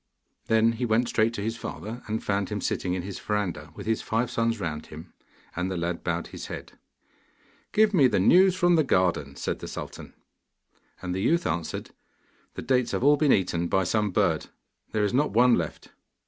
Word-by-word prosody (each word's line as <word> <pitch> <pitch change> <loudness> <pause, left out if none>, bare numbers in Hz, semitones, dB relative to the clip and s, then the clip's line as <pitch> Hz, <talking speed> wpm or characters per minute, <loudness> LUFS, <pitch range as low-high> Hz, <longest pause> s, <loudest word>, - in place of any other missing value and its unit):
Then 115 -1 +4
he 115 +2 -2
went 115 +2 +2
straight 110 0 +2
to 100 - -4
his 115 +2 -2
father, 110 +8 -6
and 110 +1 -3
found 100 -1 -1
him 105 -1 -3
sitting 90 -1 -1
in 90 - -3
his 95 0 -6
verandah 90 -8 -3
with - - -8
his 110 0 0
five 115 +2 -1
sons 115 -1 0
round 80 -5 -4
him; 80 +3 -11 0.4
and 90 +2 -1
the 95 - -3
lad 85 0 -3
bowed 85 0 -2
his - - -8
head. - - -7 1.0
'Give 215 0 +3
me 145 -8 +6
the - - +1
news 185 - +5
from 175 -2 +3
the 155 - +4
garden,' 85 - +1
said - - -3
the - - -7
sultan. - - -8 0.9
And 90 -1 -3
the 95 - -2
youth 170 - +2
answered, 85 -2 -3 0.6
'The - - -5
dates 125 -2 +1
have - - -1
all 145 +2 +6
been 145 -1 +3
eaten 85 -2 +1
by 95 +2 +2
some 105 +3 +1
bird: 90 - +1 0.4
there 110 - 0
is 100 - 0
not 140 -2 +1
one 120 +2 +5
left. 85 -7 -2
105 Hz, 200 wpm, -26 LUFS, 90-125 Hz, 1.0 s, me